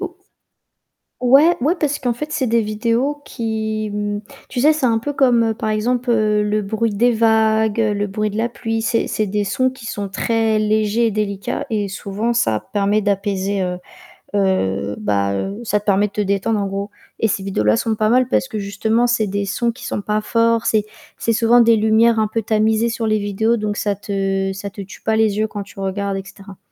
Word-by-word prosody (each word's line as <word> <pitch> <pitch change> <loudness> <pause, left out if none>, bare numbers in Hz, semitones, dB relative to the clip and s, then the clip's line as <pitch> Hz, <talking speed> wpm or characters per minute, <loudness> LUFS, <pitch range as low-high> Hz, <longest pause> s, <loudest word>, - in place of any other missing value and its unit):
O 380 - -2 1.1
ouais 275 +7 +5
ouais, 305 +7 +3
parce 290 -1 0
qu'en 245 -2 0
fait, 300 +6 -6
c'est 300 -5 0
des 230 +1 +2
vidéos 230 +7 -1
qui, 220 -2 -3
mmh, 205 0 -2 0.3
tu 250 - -3
sais, 300 - +6
c'est 300 -4 -1
un 225 -2 +2
peu 290 +5 -4
comme, 240 -5 +3
par 215 - -3
exemple, 240 +3 0
heu, 210 -2 +2
le 210 0 0
bruit 220 +2 -1
des 240 +4 +3
vagues, 220 -1 +2
le 205 -2 +1
bruit 215 +2 -2
de 210 - -6
la 230 +2 0
pluie. 225 -1 -3
C'est 230 0 +1
c'est 215 - -1
des 205 +1 -1
sons 255 +7 +1
qui 260 -3 -12
sont 200 -2 -4
très 220 +2 +1
légers 215 +2 +2
et 225 - -1
délicats, 205 +2 -3
et 210 -2 0
souvent, 200 +4 -3
ça 110 - +1
permet 205 +1 +2
d'apaiser, 200 -1 -1
heu, 180 0 -2 0.6
heu, 105 - 0
bah, 100 -1 0
heu, 195 - -3
ça 210 -2 0
te 205 - -19
permet 205 0 +3
de - - -14
te 210 - -1
détendre 200 +2 0
en 200 - -1
gros 200 +1 -4 0.3
et 225 - +3
ces 195 - -2
vidéos 190 - -1
là 105 +1 +3
sont 225 -1 0
pas 215 0 +1
mal, 255 +1 +3
parce 260 - +1
que 215 -3 -4
justement, 220 +4 0
c'est 230 -3 +1
des 200 +1 -2
sons 235 +4 0
qui 235 - -11
sont 205 - -3
pas 210 +1 0
forts, 230 +1 +1
c'est 215 -1 +2 0.3
c'est 230 - 0
souvent 235 +2 +4
des 230 -1 +5
lumières 220 +1 +3
un 215 - +2
peu 225 +1 -2
tamisées 220 +2 +1
sur 225 -1 -2
les 215 -1 +2
vidéos, 205 +3 0
donc 210 -1 -3
ça 205 -1 0
te 195 -1 -2
ça 200 +1 -6
te 200 - -9
tue 195 +1 -11
pas 220 - 0
les 220 -2 +2
yeux 220 - +1
quand 205 -2 -6
tu 200 - -14
regardes, 195 0 -2
et 195 - -5
cetera. 195 -1 -13
215 Hz, 220 wpm, -19 LUFS, 200-230 Hz, 1.1 s, sais